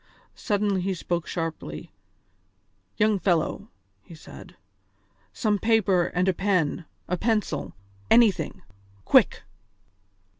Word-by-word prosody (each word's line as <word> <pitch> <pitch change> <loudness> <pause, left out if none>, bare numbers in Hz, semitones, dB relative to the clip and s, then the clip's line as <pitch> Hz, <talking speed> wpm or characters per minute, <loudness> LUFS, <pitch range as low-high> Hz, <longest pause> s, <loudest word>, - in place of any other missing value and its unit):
Suddenly 205 -2 -1
he 190 +1 -1
spoke 170 -1 -3
sharply: 160 - -5 1.1
"Young 210 -1 +2
fellow," 175 -4 0 0.3
he 165 - -14
said, 155 - -13 0.8
"some 210 -2 0
paper 200 -6 +2
and 180 +1 -1
a 190 - +3
pen, 180 -4 0 0.2
a 180 - -1
pencil, 220 +1 -1 0.4
anything. 230 -5 +3 0.4
Quick!" - - +4
190 Hz, 100 wpm, -25 LUFS, 170-210 Hz, 1.1 s, Quick